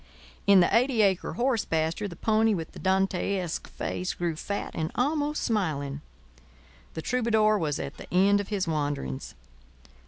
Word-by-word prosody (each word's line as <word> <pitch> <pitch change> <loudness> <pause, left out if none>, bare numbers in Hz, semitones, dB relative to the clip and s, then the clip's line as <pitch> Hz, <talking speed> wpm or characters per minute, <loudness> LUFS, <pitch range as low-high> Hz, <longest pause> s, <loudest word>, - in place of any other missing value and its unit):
In 200 -2 +7
the 175 - +3
eighty 240 -2 +3
acre 190 -3 +1
horse 245 -2 +1
pasture 160 +5 -1
the 175 - -9
pony 220 +1 +2
with 165 -3 -5
the - - -11
Dantesque 190 -2 0
face 185 +1 -4
grew 170 -2 -2
fat 200 +5 -4
and 160 0 -2
almost 295 +3 0
smiling. 150 - -1 0.9
The 160 - -4
troubadour 220 -4 +2
was 150 -4 -1
at - - -6
the - - -11
end 200 +3 +4
of 200 - -8
his 200 -4 -1
wanderings. 145 - -3
195 Hz, 155 wpm, -27 LUFS, 160-220 Hz, 0.9 s, In